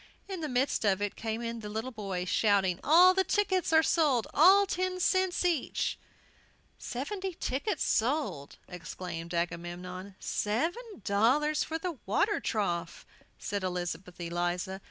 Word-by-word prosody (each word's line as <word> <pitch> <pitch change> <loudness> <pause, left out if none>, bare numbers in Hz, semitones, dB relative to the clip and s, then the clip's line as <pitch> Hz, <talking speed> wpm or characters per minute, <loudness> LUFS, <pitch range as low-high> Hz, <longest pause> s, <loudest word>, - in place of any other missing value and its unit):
In 380 -4 -5
the 305 - -3
midst 255 0 0
of 200 -2 +2
it 205 -1 -2
came 225 +1 -4
in 230 0 -4
the 210 -1 -7
little 220 +4 -4
boys, 195 -5 -4
shouting, 195 -3 +2
"All 355 +5 +7
the 380 0 +2
tickets 375 -2 +1
are 320 0 +6
sold, 285 -10 +2
at 385 +6 +6
ten 370 0 -1
cents 375 0 +1
each!" 335 -7 0 0.8
"Seventy 370 +8 -4
tickets 300 +7 -2
sold!" 240 - -1
exclaimed 170 -1 -7
Agamemnon. 175 +3 -4
"Seven 330 - -2
dollars 260 +11 +2
for 320 - -3
the 325 -4 -5
water 405 - +2
trough!" 175 -6 -2 0.3
said 200 -1 -3
Elizabeth 180 0 -4
Eliza. 175 +2 -2
230 Hz, 135 wpm, -30 LUFS, -, 0.8 s, All